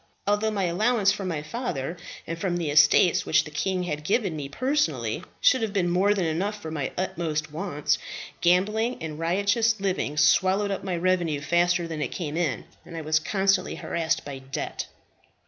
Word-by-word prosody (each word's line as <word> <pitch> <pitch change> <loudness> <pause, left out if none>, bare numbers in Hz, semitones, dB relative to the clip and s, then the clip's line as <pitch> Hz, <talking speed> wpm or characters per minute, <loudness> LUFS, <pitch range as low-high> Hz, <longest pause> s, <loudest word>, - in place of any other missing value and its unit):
Although 205 +2 +2
my 205 -3 -1
allowance 200 +4 +2
from 200 -2 -4
my 155 -4 -3
father, 170 - -4 0.3
and 165 - -4
from 175 -2 -1
the 165 -4 -2
estates 150 +3 +5
which - - +3
the 150 - -10
king 185 +4 -1
had 150 -4 -4
give 205 +8 +2
me 155 -7 -4
personally, 275 - -1 0.2
should - - +4
have 220 -3 -2
been 180 -4 +1
more 195 +4 +3
than 190 -4 0
enough 195 +7 -1
for 160 -5 -7
my 145 -4 -3
utmost 155 -4 -2
wants, 155 -2 -1 0.4
gambling 210 +7 +2
and 155 -1 -6
riotous 205 +6 +1
living 190 -6 -1
swallowed 190 +6 +3
up 195 - -3
my 185 -3 -2
revenue 170 -4 +1
faster 175 +3 +1
than 160 -2 -5
it 145 - 0
came 155 +2 -5
in, 165 -5 -1 0.2
and 165 - -9
I - - -3
was 155 0 +2
constantly 195 +1 +1
harassed 160 -2 -2
by 140 -2 -6
debt. 135 0 -5
175 Hz, 180 wpm, -26 LUFS, 155-200 Hz, 0.4 s, estates